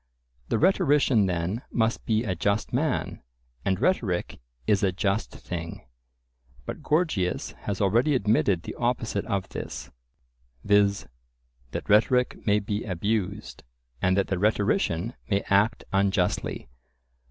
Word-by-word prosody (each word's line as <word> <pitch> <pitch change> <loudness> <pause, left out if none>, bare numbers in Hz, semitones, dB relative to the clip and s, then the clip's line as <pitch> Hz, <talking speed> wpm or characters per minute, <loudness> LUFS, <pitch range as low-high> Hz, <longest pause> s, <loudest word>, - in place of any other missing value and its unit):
The - - +2
rhetorician 145 - +3
then 90 +5 -2
must 115 -1 0
be 110 0 +2
a 100 -5 -1
just 100 +6 -1
man, 140 +2 -1 0.4
and 95 -1 0
rhetoric 105 - 0 0.3
is 100 -2 +3
a 95 - +2
just 100 +3 -1
thing. 85 -5 -7 0.8
But - - -6
Gorgias 150 - 0
has 100 -2 -2
already 115 +9 +3
admitted 105 -6 +2
the - - -6
opposite 120 -4 -1
of 100 -3 -2
this, - - -7 0.7
viz. 100 -1 +3 0.6
that - - -5
rhetoric 125 +4 +3
may 105 0 +4
be 105 +1 -2
abused, 105 +1 -2 0.4
and 95 +1 +2
that 100 - +3
the 95 -2 -1
rhetorician 105 - +1 0.2
may 100 -1 +2
act 105 +3 +3
unjustly. 95 - 0
105 Hz, 125 wpm, -26 LUFS, 95-115 Hz, 0.8 s, may